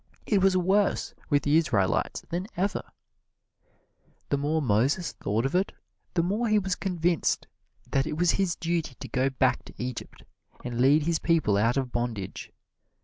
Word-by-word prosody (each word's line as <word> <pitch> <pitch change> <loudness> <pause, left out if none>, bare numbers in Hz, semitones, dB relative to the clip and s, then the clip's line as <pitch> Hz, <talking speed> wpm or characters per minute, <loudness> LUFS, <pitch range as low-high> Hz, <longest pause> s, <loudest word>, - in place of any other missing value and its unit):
It 205 -3 +2
was 190 -1 +4
worse 195 +3 +1 0.2
with 145 -3 +2
the 150 +2 +4
Israelites 110 - +1
than 180 +3 -2
ever! 195 +3 0 1.5
The 140 - +2
more 150 +3 +1
Moses 135 - +1
thought 110 +5 -1
of 135 - -1
it 185 +2 +1 0.4
the 170 - +3
more 210 +7 0
he 215 -1 +3
was 190 -2 0
convinced 175 -3 0 0.5
that 135 +1 +1
it 155 -1 -3
was 175 0 +4
his 190 -3 0
duty 165 -5 -2
to - - -8
go 130 +1 +1
back 130 -1 +1
to - - -13
Egypt 125 -1 -6 0.4
and 120 -1 -2
lead 145 +4 +5
his 165 +1 +1
people 165 - +2
out 115 +5 +2
of 130 -2 -1
bondage. 120 -5 -4
155 Hz, 165 wpm, -27 LUFS, 125-180 Hz, 1.5 s, lead